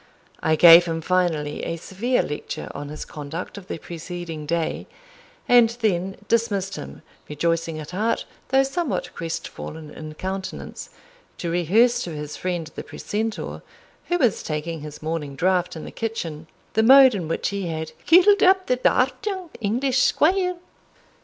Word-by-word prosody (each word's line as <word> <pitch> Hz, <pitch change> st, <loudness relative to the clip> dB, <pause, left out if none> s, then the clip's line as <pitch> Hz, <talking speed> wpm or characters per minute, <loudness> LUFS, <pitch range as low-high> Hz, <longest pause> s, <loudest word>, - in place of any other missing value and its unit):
I 160 Hz, -, +2 dB
gave 170 Hz, +2 st, +9 dB
him 165 Hz, -1 st, -2 dB
finally 165 Hz, -4 st, 0 dB
a 165 Hz, -, -2 dB
severe 220 Hz, +9 st, -1 dB
lecture 150 Hz, -, -5 dB
on 145 Hz, 0 st, -6 dB
his 150 Hz, -, -6 dB
conduct 155 Hz, +5 st, -7 dB
of 200 Hz, -2 st, -10 dB
the -, -, -4 dB
preceding 165 Hz, -2 st, -7 dB
day, 165 Hz, 0 st, -1 dB, 0.6 s
and 240 Hz, -2 st, +6 dB
then 190 Hz, -3 st, 0 dB
dismissed 205 Hz, -4 st, 0 dB
him 70 Hz, 0 st, -9 dB, 0.3 s
rejoicing 165 Hz, +1 st, -1 dB
at 155 Hz, 0 st, -7 dB
heart, 215 Hz, +5 st, 0 dB, 0.2 s
though 270 Hz, 0 st, +4 dB
somewhat 295 Hz, +2 st, -2 dB
crestfallen 160 Hz, -1 st, -6 dB
in 155 Hz, -1 st, -9 dB
countenance, 190 Hz, +2 st, -6 dB, 0.5 s
to 170 Hz, -, -3 dB
rehearse 220 Hz, +9 st, +3 dB
to 170 Hz, -3 st, -6 dB
his 150 Hz, 0 st, -6 dB
friend 175 Hz, -3 st, -3 dB
the -, -, -6 dB
precentor, 220 Hz, +1 st, -4 dB, 0.5 s
who 350 Hz, -, +1 dB
was 250 Hz, -, +2 dB
taking 155 Hz, +1 st, -4 dB
his 150 Hz, 0 st, -9 dB
morning 155 Hz, -3 st, -3 dB
draught 180 Hz, +4 st, +1 dB
in 160 Hz, -, -7 dB
the -, -, -8 dB
kitchen, 165 Hz, -9 st, -4 dB, 0.3 s
the 220 Hz, -, +3 dB
mode 260 Hz, +2 st, +8 dB
in 180 Hz, -6 st, -3 dB
which 165 Hz, -, -1 dB
he 200 Hz, -3 st, -3 dB
had 160 Hz, -1 st, -4 dB, 0.2 s
"cuitled 375 Hz, +4 st, +6 dB
up 375 Hz, 0 st, +5 dB
the 250 Hz, -, +1 dB
daft 255 Hz, +6 st, +1 dB
young 375 Hz, -5 st, -4 dB
English 250 Hz, +5 st, +1 dB
squire." 360 Hz, +7 st, +3 dB
180 Hz, 155 wpm, -23 LUFS, 160-235 Hz, 0.6 s, gave